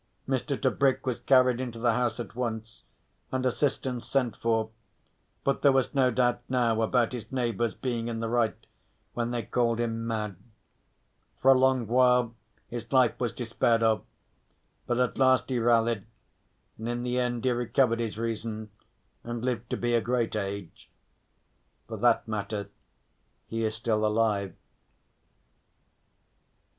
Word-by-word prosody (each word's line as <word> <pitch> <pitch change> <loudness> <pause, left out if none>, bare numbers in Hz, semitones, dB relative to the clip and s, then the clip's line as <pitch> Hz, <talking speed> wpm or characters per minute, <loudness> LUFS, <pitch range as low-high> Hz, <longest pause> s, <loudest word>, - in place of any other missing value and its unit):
Mr. 135 +1 -1
Tebrick 135 0 +1
was 125 -3 -1
carried 130 -2 +4
into 120 -3 -5
the 115 0 +2
house 120 0 0
at 115 -5 -6
once 115 -1 -5 0.5
and 130 0 -1
assistance 130 -1 -1
sent 125 -4 0
for, 115 -1 0 0.7
but 140 - 0
there 140 - +6
was 135 +1 +1
no 130 -2 +4
doubt 120 0 +1
now 120 -3 +2
about 120 +1 +2
his 120 0 -7
neighbours 120 -4 -1
being 120 -3 -2
in 115 -1 -3
the 115 - -2
right 115 -1 0 0.5
when 120 -1 -1
they 120 -1 -2
called 115 +1 0
him 115 -1 -2
mad. 105 -4 -3 1.0
For 135 - +6
a 130 - +5
long 130 -2 +3
while 125 0 +3 0.3
his 120 -1 -7
life 130 -3 +4
was 120 -2 0
despaired 115 -1 +1
of, 110 -1 +2 0.8
but 120 - 0
at 125 +1 0
last 130 0 +3
he 125 - +1
rallied, 115 -3 +2 0.7
and 115 +1 -4
in 120 0 -2
the 125 0 0
end 120 -1 -1
he 130 - +3
recovered 120 0 +1
his 115 -2 -3
reason 110 -1 -4 0.5
and 120 0 -4
lived 120 -3 -2
to - - -1
be 120 0 0
a 115 - +3
great 115 0 0
age, 100 -3 -5 1.0
for - - -6
that - - +3
matter 100 -1 -4 0.7
he 115 0 -3
is 110 0 -1
still 110 -2 0
alive. 105 -3 +1
120 Hz, 150 wpm, -28 LUFS, 115-125 Hz, 1.0 s, there